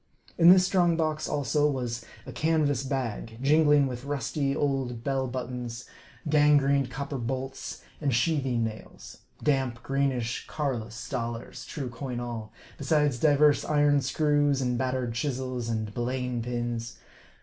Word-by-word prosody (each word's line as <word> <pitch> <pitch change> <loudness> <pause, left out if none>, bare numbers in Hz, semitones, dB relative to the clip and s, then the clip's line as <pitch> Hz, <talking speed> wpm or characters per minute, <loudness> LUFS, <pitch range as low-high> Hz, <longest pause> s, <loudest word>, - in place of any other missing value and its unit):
In 170 0 +7
this 185 0 +8
strong 175 -3 +3
box, 155 -2 -1
also, 150 +1 +1
was 120 -4 -3 0.2
a - - -7
canvas 155 -4 +1
bag, 125 -5 -3
jingling 150 +1 +4
with 125 -2 -5
rusty 140 0 -1
old 135 -5 -1
bell 135 0 0
buttons, 125 -1 -5 0.4
gangrened 145 -3 +4
copper 140 +2 -4
bolts, 130 +2 -5 0.2
and 140 -3 +1
sheathing 130 -2 +1
nails; 110 -1 -7 0.2
damp, 130 -5 0
greenish 135 -4 -1
Carolus 120 -5 -3
dollars 115 -1 -5
(true 135 -5 -5
coin 125 0 -5
all), 120 -3 -5 0.3
besides 145 -3 +2
divers 150 0 +4
iron 145 -1 +3
screws, 145 0 +2
and 125 -2 0
battered 130 -1 -1
chisels, 130 -1 -2
and 110 -2 -2
belaying 125 0 -2
pins. 120 0 -3
130 Hz, 130 wpm, -28 LUFS, 120-145 Hz, 0.4 s, this